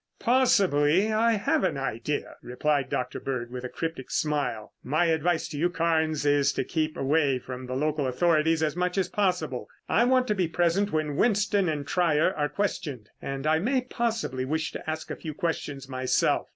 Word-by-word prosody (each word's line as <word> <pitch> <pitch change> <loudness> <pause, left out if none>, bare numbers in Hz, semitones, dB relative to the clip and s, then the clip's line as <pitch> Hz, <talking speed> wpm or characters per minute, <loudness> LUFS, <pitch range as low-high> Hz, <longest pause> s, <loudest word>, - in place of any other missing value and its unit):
"Possibly 200 - +3
I 230 +2 +3
have 205 -2 +1
an 185 - 0
idea," 135 +2 -3
replied 140 +3 -1
Dr. 125 - -2
Bird 125 -3 -4
with 125 0 -6
a 125 - -4
cryptic 160 -4 -5
smile. 135 -8 -1
"My 155 +6 +1
advice 165 +1 +1
to 150 - -6
you, 175 +3 +2
Carnes, 160 -3 0
is 145 -1 +3
to - - -1
keep 155 -2 -2
away 140 -1 +2
from 125 0 -7
the 130 - -4
local 150 0 0
authorities 160 +3 +2
as 150 -1 0
much 180 +1 -1
as 185 -2 +1
possible. 180 -10 -1 0.2
I 235 - +3
want 255 0 +3
to - - +3
be 185 -4 0
present 175 +5 +1
when 155 -2 -1
Winston 205 -4 +2
and 145 -2 -2
Trier 170 0 +2
are 150 -3 -1
questioned 145 - -3
and 135 +1 -4
I 155 +1 +3
may 255 +8 +1
possibly 230 - -2
wish 155 +3 -2
to - - -6
ask 155 0 -4
a - - -3
few 155 -3 -7
questions 145 -5 -3
myself. 130 -1 +1
155 Hz, 185 wpm, -27 LUFS, 140-180 Hz, 0.2 s, Possibly